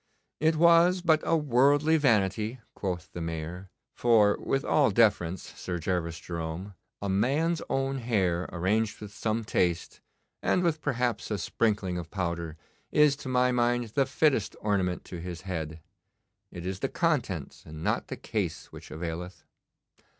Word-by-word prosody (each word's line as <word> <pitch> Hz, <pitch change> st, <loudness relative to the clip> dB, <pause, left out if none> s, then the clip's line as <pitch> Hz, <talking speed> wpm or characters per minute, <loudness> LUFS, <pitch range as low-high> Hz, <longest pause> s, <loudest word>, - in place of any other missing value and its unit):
'It 160 Hz, +1 st, +3 dB
was 170 Hz, +2 st, +5 dB
but 160 Hz, -3 st, +4 dB
a 165 Hz, -, +2 dB
worldly 145 Hz, +2 st, +3 dB
vanity,' 110 Hz, -4 st, +1 dB
quoth 90 Hz, -4 st, -4 dB
the 85 Hz, -, -5 dB
Mayor; 85 Hz, +3 st, -5 dB, 0.2 s
'for, 110 Hz, -4 st, +4 dB
with 135 Hz, +1 st, -1 dB
all 145 Hz, -5 st, +4 dB
deference, 95 Hz, -5 st, +2 dB
Sir 90 Hz, -1 st, -4 dB
Gervas 85 Hz, -1 st, -2 dB
Jerome, 85 Hz, +3 st, -5 dB, 0.3 s
a -, -, -1 dB
man's 145 Hz, -, +1 dB
own 135 Hz, 0 st, 0 dB
hair 95 Hz, -7 st, 0 dB
arranged 105 Hz, +5 st, 0 dB
with 105 Hz, -1 st, -9 dB
some 115 Hz, 0 st, -1 dB
taste, 90 Hz, -5 st, -1 dB, 0.4 s
and 180 Hz, -, +2 dB
with 160 Hz, -3 st, +1 dB
perhaps 125 Hz, -5 st, -1 dB
a 105 Hz, -, -1 dB
sprinkling 100 Hz, -3 st, 0 dB
of 85 Hz, -2 st, -7 dB
powder, 85 Hz, -3 st, -3 dB, 0.3 s
is 150 Hz, -2 st, +5 dB
to 130 Hz, -, -7 dB
my 125 Hz, 0 st, +3 dB
mind 120 Hz, -1 st, +1 dB
the 135 Hz, +4 st, +1 dB
fittest 135 Hz, -6 st, +1 dB
ornament 95 Hz, -4 st, 0 dB
to 90 Hz, -2 st, -7 dB
his 85 Hz, -1 st, -6 dB
head. 80 Hz, -4 st, -5 dB, 0.7 s
It 85 Hz, 0 st, -8 dB
is 95 Hz, 0 st, -3 dB
the 135 Hz, -, -1 dB
contents 125 Hz, -, -1 dB
and 80 Hz, +1 st, -9 dB
not -, -, 0 dB
the -, -, -6 dB
case -, -, -3 dB
which -, -, -11 dB
availeth. 85 Hz, +2 st, -6 dB
105 Hz, 150 wpm, -28 LUFS, 90-135 Hz, 0.7 s, was